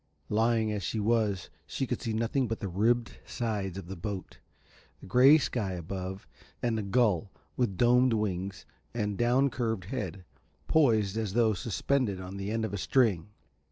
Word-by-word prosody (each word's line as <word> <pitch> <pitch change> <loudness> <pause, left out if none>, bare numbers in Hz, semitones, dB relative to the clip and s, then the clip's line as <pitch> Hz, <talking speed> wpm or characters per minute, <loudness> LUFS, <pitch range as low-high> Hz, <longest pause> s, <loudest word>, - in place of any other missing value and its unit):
Lying 110 0 +2
as 105 -1 -2
she 110 +5 -2
was 105 -4 0 0.2
she 135 - -2
could 125 -2 -3
see 115 - -2
nothing 115 +4 0
but 115 0 -3
the 100 - -3
ribbed 115 +6 0
sides 100 -6 -3
of 95 - -6
the 95 +2 -7
boat, 95 +1 -6 0.6
the - - -12
grey 130 +9 +7
sky 110 -9 -2
above, 95 +2 -6 0.4
and 115 -2 +1
a - - -1
gull 105 -2 +1 0.3
with 110 -7 0
domed 125 +2 +4
wings 95 -3 -2 0.3
and 105 -3 -1
down 125 +5 +2
curved 115 -6 -2
head, 95 -6 -5 0.4
poised, 110 -9 +3
as 110 -4 -2
though 115 -1 +3
suspended 105 +3 -1
on 95 +1 -7
the 100 +1 -4
end 110 +1 -1
of 110 - -5
a 100 - -2
string. 105 -8 +2
110 Hz, 170 wpm, -29 LUFS, 95-120 Hz, 0.6 s, grey